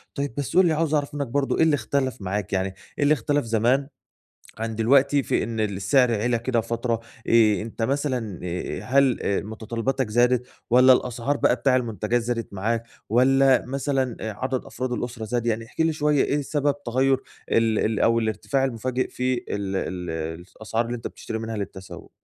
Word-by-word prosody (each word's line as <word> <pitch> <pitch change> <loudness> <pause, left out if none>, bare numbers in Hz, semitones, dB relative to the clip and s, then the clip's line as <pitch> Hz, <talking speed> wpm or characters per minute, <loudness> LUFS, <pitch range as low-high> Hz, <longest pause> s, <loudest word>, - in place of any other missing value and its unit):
طيب 140 -4 -2
بس 145 +4 -2
قُل 185 - +7
لي 165 - +3
عاوز 155 0 0
أعرف 145 0 0
منك 140 -3 -2
برضو 135 +3 0
إيه - - +4
اللي 160 -2 +4
اختلف 130 -2 -2
معاك 100 +1 -3
يعني، 95 0 +1 0.3
إيه 145 - +1
اللي 145 - +5
اختلف 145 +1 0
زمان 120 +5 +2 0.7
عن 115 0 -3
دلوقتي 140 +5 +3
في - - 0
إن 115 0 -4
السعر 110 +5 +2
عِلَى 120 0 +1
كده 120 -1 0
فترة، 115 0 -2 0.3
آآ، 110 -4 +4
أنت 115 +1 -7
مثلًا 125 - -1
آآ، 90 +1 -4
هل 135 +1 +3 0.3
متطلباتك 115 +3 -2
زادت، 125 +2 +2 0.2
والّا 130 +2 +7
الأسعار 125 +3 -1
بقى 125 - +3
بتاع 130 +1 +2
المنتجات 120 -1 0
زادت 115 -2 -3
معاك، 115 +4 -1 0.3
والّا 130 +2 +4
مثلًا 135 -1 -1
عدد 125 +4 -3
أفراد 130 0 -4
الأسرة 120 -2 -4
زاد؟ 120 +1 -2
يعني 115 -1 -1
احكِ 140 - -4
لي 160 -1 +2
شوية 150 -1 +2
إيه 145 - 0
سبب 145 0 -1
تغير 130 +3 +2 0.3
ال 115 -1 +3
ال 110 -1 0
أو 115 0 +3
الارتفاع 115 +5 -1
المفاجئ 130 0 -1
في 130 0 -1
ال 120 - -2 0.3
الس 85 -2 -4
الأسعار 110 +1 -1
اللي 120 +1 -3
أنت 115 - -5
بتشتري 110 - -6
منها 110 0 -4
للتسوق؟ 95 -2 -7
120 Hz, 180 wpm, -24 LUFS, 110-135 Hz, 0.7 s, قُل